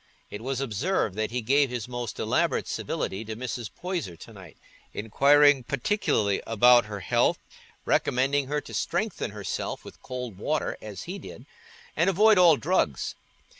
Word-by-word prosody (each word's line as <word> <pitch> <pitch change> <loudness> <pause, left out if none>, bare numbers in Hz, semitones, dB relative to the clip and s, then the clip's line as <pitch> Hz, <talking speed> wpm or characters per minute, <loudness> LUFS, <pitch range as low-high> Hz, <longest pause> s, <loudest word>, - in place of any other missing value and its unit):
It 105 - -6
was 130 +1 -3
observed 135 - -1
that 110 0 -1
he 125 0 -3
gave 140 +4 +3
his 120 -3 -4
most 120 -3 -5
elaborate - - 0
civility 95 +3 -3
to 110 0 -6
Mrs. 120 -2 -5
Poyser 175 - -4
to 115 - -13
night, 95 -5 -13 0.4
inquiring 140 +5 +4
particularly 120 - 0
about 120 +1 +5
her 105 -2 -6
health, 90 - +2 0.5
recommending 135 +2 +1
her 150 +1 -1
to - - -12
strengthen - - -2
herself - - -5
with - - -13
cold 125 -6 -6
water 150 +6 -1
as 105 -4 -8
he 190 +3 -6
did, - - -11 0.5
and - - +3
avoid 210 +2 +5
all 170 -4 +7
drugs. 180 +7 0
125 Hz, 155 wpm, -26 LUFS, 110-145 Hz, 0.5 s, all